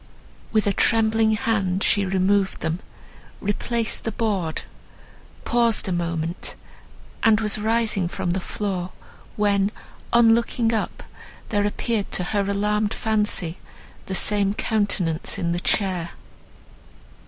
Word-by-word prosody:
With 215 -1 +2
a 200 - +2
trembling 220 0 +3
hand 200 -4 0
she 200 -2 +2
removed 190 +1 +1
them, 160 +2 -1 0.6
replaced 225 +3 -1
the 225 - -2
board, 195 -7 -1 0.8
paused 235 -3 +3
a - - -1
moment, 170 -1 -3 0.7
and 220 -1 +5
was 215 -1 +1
rising 220 -4 +1
from 175 0 -2
the 185 - 0
floor, 185 -1 -4 0.4
when, 200 -1 +2 0.4
on 235 -1 +6
looking 230 0 +1
up, 220 - -2 0.5
there 205 -1 +1
appeared 210 0 -2
to 180 - +1
her 205 +3 0
alarmed 210 +1 0
fancy 210 -6 -1 0.5
the 190 - -3
same 205 0 +2
countenance 200 -8 0
in 170 -1 -1
the 175 - -1
chair. 180 -3 0
205 Hz, 120 wpm, -23 LUFS, 185-220 Hz, 0.8 s, on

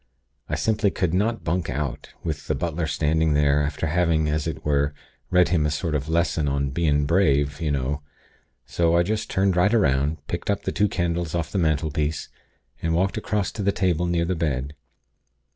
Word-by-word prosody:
I - - 0
simply 110 -2 +1
could 90 -3 -1
not 110 +5 0
bunk 85 +1 -1
out, 70 -3 -3
with - - -4
the - - 0
butler 85 -1 -2
standing 80 +1 +1
there, 75 0 +3
after 75 +2 -2
having, 80 -1 +2
as 75 +1 -1
it 80 - -5
were, 70 0 +1 0.3
read 90 -1 +4
him 85 -4 +2
a 75 - +1
sort 75 +2 -2
of 75 0 -2
lesson 80 -2 +1
on 70 0 0
'bein' 75 -1 +1
brave, 70 -3 +2
y'know.' 70 -2 -1 0.6
So 85 0 +2
I 85 - +4
just 110 +4 -2
turned 95 -1 +2
right 90 +3 +3
'round, 75 - +2
picked 85 +7 -4
up 100 0 0
the - - -1
two 105 - +2
candles 85 -2 -1
off 85 - -2
the 100 - 0
mantelpiece, 75 -1 0 0.5
and 80 0 0
walked 95 +5 +1
across 105 -3 -1
to 105 - -5
the 100 0 +2
table 90 -3 0
near 85 -1 +1
the 90 - 0
bed. 75 -5 -2
80 Hz, 190 wpm, -24 LUFS, 75-90 Hz, 0.6 s, read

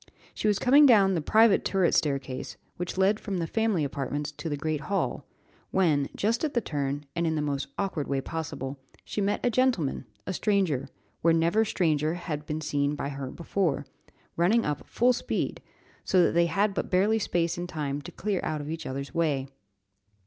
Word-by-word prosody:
She - - -2
was 205 -2 +3
coming 280 +6 +6
down 200 -6 +6
the 170 - 0
private 220 +6 +4
turret 190 -3 +2
staircase, 135 -3 -1 0.2
which 180 +1 -4
led 195 +3 +3
from 200 -3 -3
the 170 - -1
family 220 -3 +1
apartments 140 +1 -3
to 160 +2 -6
the 145 - -2
great 155 0 -2
hall, 195 +7 -2 0.4
when, 155 -7 +2
just 230 +6 0
at 300 -4 -1
the - - +4
turn, 145 -6 -3
and 170 0 0
in 160 - 0
the - - 0
most 140 -1 -2
awkward 185 -7 -2
way 140 -1 0
possible, 140 -2 -5 0.3
she 210 - -3
met 200 +4 0
a 245 - +3
gentleman, 240 - +1 0.2
a 185 - -3
stranger, 180 - +1 0.3
where 165 0 +4
never 170 +7 +3
stranger 160 -6 +1
had 155 -4 -5
been 155 +1 -3
seen 145 -1 0
by 140 - -3
her 135 -2 -5
before, 165 -4 -1 0.5
running 205 +8 +3
up 150 -1 -3
full 250 +2 +3
speed, 245 - -2 0.4
so 185 -2 +4
that - - +3
they 170 0 +3
had 200 +5 +1
but - - -3
barely 205 +4 +3
space 170 -4 0
and 175 0 -5
time 145 -3 -3
to - - -9
clear 200 -2 -2
out 155 -2 -2
of 145 +1 -5
each 165 0 -5
other's 140 +1 -5
way. 145 -5 0
165 Hz, 190 wpm, -27 LUFS, 145-200 Hz, 0.5 s, coming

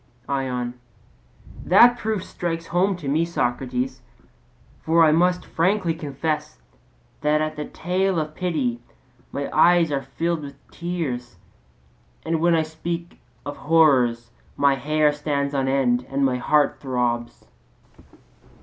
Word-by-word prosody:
ION: 125 -3 -2 0.9
That 235 +7 +6
proof 220 -4 -2
strikes 165 -1 -4
home 185 +4 +1
to 155 -6 -8
me, 150 +4 +2
Socrates. 125 -5 -2 0.8
For 165 +1 +4
I 155 - +5
must 180 +3 +2
frankly 180 0 +1
confess 150 - -3 0.6
that 150 +1 +2
at 155 0 -2
the 150 0 -4
tale 185 +2 -1
of 155 -1 -2
pity 145 -10 -2 0.5
my 140 0 -3
eyes 170 0 +5
are 140 -1 0
filled 160 +5 -2
with 140 -1 -11
tears, 145 - -4 0.9
and 165 -1 0
when 170 0 +4
I 160 - +2
speak 170 +2 -6 0.3
of 145 - -6
horrors, 130 -7 +3 0.3
my 140 -1 +4
hair 150 +2 +2
stands 145 -1 -2
on 135 -1 0
end 125 -2 +1
and 135 0 +1
my 130 -1 +1
heart 150 +3 +2
throbs. 120 -3 -2
150 Hz, 130 wpm, -23 LUFS, 135-170 Hz, 0.9 s, That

